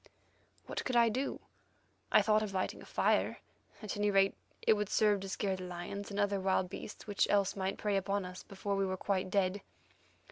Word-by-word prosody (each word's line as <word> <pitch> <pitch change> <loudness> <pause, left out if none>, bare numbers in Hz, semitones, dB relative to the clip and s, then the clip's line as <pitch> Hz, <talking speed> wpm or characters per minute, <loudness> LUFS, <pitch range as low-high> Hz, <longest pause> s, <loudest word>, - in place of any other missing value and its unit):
What - - -4
could 255 - -2
I 235 -1 +6
do? 260 +5 -2 0.7
I - - +6
thought 215 0 +4
of 205 -2 -3
lighting 185 - -2
a - - -12
fire; - - +2 0.5
at 215 - -3
any 205 0 +1
rate 195 -1 +4 0.3
it - - +6
would 210 -1 -1
serve 210 -2 +3
to 195 0 -6
scare 190 0 -1
the 185 -1 -6
lions 180 +3 -6
and 200 0 -4
other 205 -1 +2
wild 190 -1 +1
beasts 210 - -8
which 205 -2 +1
else 200 -1 +2
might 190 -1 -2
prey 205 -2 0
upon 195 0 -1
us 180 0 -8
before 200 0 -3
we 195 - +1
were 185 0 -2
quite 185 -1 -1
dead. 195 0 +1
200 Hz, 205 wpm, -33 LUFS, 190-205 Hz, 0.7 s, I